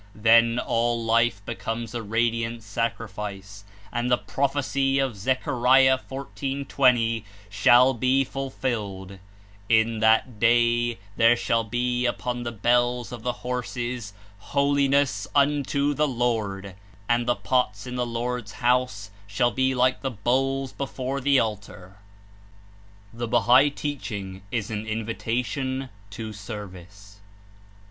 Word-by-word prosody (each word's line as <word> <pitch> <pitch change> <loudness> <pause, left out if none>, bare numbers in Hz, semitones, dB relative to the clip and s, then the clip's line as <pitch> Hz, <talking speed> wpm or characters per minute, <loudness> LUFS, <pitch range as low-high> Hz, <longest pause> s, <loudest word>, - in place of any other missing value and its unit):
Then 115 +2 +5
all 115 -1 0
life 115 -3 +2
becomes 115 0 -4
a 120 - -3
radiant 115 +1 -1
sacrifice, 105 -2 -5 0.3
and 120 +1 -1
the 125 - +4
prophecy 135 0 0
of 135 -4 0
Zechariah 130 +3 +3
14.20 135 -4 0 0.3
shall 120 +6 +5
be 130 +3 +2
fulfilled: 110 -8 -4 0.5
"/;/ 110 0 +3
that 110 +1 +3
day 120 0 +3 0.2
there 115 +1 +6
shall 115 -1 0
be 125 +2 -1
upon 120 0 -3
the 120 -3 -6
hells 120 0 +2
of 120 -2 -7
the 125 - -1
horses 125 -3 -4 0.3
HOLINESS 140 -4 +1
UNTO 145 0 +2
THE 150 +1 +1
LORD, 110 -6 -2 0.3
and 120 0 +1
the 120 - +3
pots 115 -6 -1
in 125 0 -6
the 125 - 0
Lord^s 120 -2 -4
house 120 -5 0 0.2
shall 110 +5 +1
he 130 0 +1
like 125 +1 +2
the 135 - -1
bowls 130 +4 -1
before 135 0 -4
the 140 +1 +3
altar 105 -3 -5 1.2
J' - - -16
^Al - - -12
THE 120 - -2
BAIIAI 130 +6 +4
TEACHING 100 -10 -5
IS 110 -2 -3
AN 110 0 -4
INVITATION 120 +4 -3 0.2
TO 110 +1 -7
SERVICE. 100 -1 -10
120 Hz, 125 wpm, -25 LUFS, 110-130 Hz, 1.2 s, there